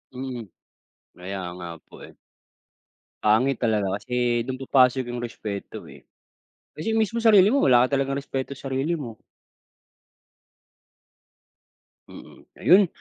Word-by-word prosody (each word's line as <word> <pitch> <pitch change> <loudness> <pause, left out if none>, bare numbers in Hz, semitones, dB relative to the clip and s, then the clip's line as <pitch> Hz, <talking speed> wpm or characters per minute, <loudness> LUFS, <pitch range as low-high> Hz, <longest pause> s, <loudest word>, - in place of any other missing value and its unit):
Mm. 125 -4 -6 0.7
Kaya 95 +2 -6 0.2
nga 90 -1 -8 0.2
po - - -15
eh. - - -13 1.1
Pangit 120 +5 +3
talaga, 105 -5 0
kasi, 120 +1 -1
do'n 130 +1 -5
papasok 130 -1 +3
yung 120 - -4
respeto 105 -3 -7
eh. - - -15 0.7
Kasi 190 +9 -2
mismong 225 +1 0
sarili 205 -3 +7
mo, 275 +5 +2
wala 125 -1 +5
ka 140 - 0
talagang 135 0 -1
respeto 135 -1 -5
sa 135 0 -7
sarili 135 +5 -1
mo. 125 -9 -6 2.9
Mm, - - -14
ayun. 190 +1 +6
130 Hz, 120 wpm, -24 LUFS, 115-140 Hz, 2.9 s, sarili